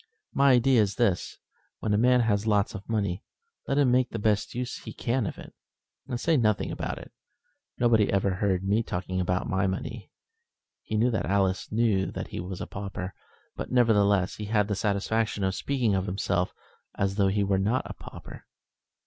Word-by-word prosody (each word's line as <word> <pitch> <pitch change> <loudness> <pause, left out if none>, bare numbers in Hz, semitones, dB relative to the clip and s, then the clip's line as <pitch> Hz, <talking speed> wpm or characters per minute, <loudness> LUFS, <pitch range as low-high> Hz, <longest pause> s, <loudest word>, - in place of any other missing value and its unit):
My 140 -1 +5
idea 125 -1 +5
is 100 -1 0
this, 100 -7 0 0.4
when 110 - -1
a - - +3
man 125 +1 +5
has 110 -2 +1
lots 105 -2 +2
of 95 - -9
money, 100 -4 -1 0.4
let 140 - 0
him 140 -4 +4
make 125 0 +3
the - - -4
best 105 0 0
use 125 0 -3
he - - -9
can 120 -2 -1
of - - -6
it, - - -11 0.5
and 120 - -3
say 165 +3 +2
nothing 110 -5 +1
about - - -4
it. - - -11 0.7
Nobody 115 -3 +3
ever 100 0 +2
heard 95 -1 0
me 100 +3 +2
talking 95 -3 -3
about 90 +1 -1
my 95 +1 +1
money." 100 +3 -5 0.7
He 110 - -3
knew 120 +3 +3
that 110 - -1
Alice 95 -1 +1
knew 105 -4 +2
that - - -5
he - - -5
was 90 +1 -5
a - - -3
pauper; 95 -1 -6 0.4
but, - - -6
nevertheless, 105 -6 +3
he 105 - -5
had 105 -1 +1
the 105 - 0
satisfaction 105 +1 0
of 95 0 +1
speaking 125 -2 0
of 95 0 0
himself 90 -2 0 0.4
as 100 0 0
though 100 -2 +4
he 100 +1 +1
were 100 -1 +1
not 110 +7 +1
a - - -6
pauper. - - -11
105 Hz, 190 wpm, -27 LUFS, 95-115 Hz, 0.7 s, My